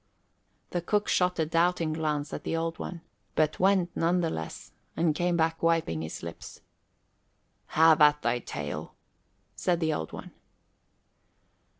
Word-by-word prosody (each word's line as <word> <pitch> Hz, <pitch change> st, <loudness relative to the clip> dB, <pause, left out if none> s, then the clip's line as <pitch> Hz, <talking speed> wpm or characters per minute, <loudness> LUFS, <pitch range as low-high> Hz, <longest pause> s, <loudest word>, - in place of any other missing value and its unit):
The 175 Hz, -, -1 dB
cook 205 Hz, +4 st, 0 dB
shot 180 Hz, 0 st, +2 dB
a 160 Hz, -, +1 dB
doubting 165 Hz, 0 st, +1 dB
glance 150 Hz, -2 st, -2 dB
at -, -, -5 dB
the 165 Hz, -, -1 dB
Old 165 Hz, 0 st, -2 dB
One, 175 Hz, -2 st, -6 dB, 0.3 s
but 155 Hz, -1 st, +1 dB
went 190 Hz, -2 st, +2 dB
none 175 Hz, +2 st, +2 dB
the 165 Hz, -2 st, 0 dB
less, 80 Hz, 0 st, -6 dB, 0.3 s
and 165 Hz, -2 st, +2 dB
came 175 Hz, +2 st, 0 dB
back 165 Hz, 0 st, +1 dB
wiping 165 Hz, -, +1 dB
his 80 Hz, +1 st, -6 dB
lips. 85 Hz, 0 st, -9 dB, 1.2 s
"Have 160 Hz, -1 st, +6 dB
at 150 Hz, 0 st, +5 dB
thy 120 Hz, +1 st, +1 dB
tale," -, -, -6 dB, 0.6 s
said 175 Hz, -2 st, 0 dB
the 160 Hz, -2 st, +1 dB
Old 80 Hz, -, -4 dB
One. -, -, -9 dB
165 Hz, 150 wpm, -28 LUFS, 150-175 Hz, 1.2 s, Have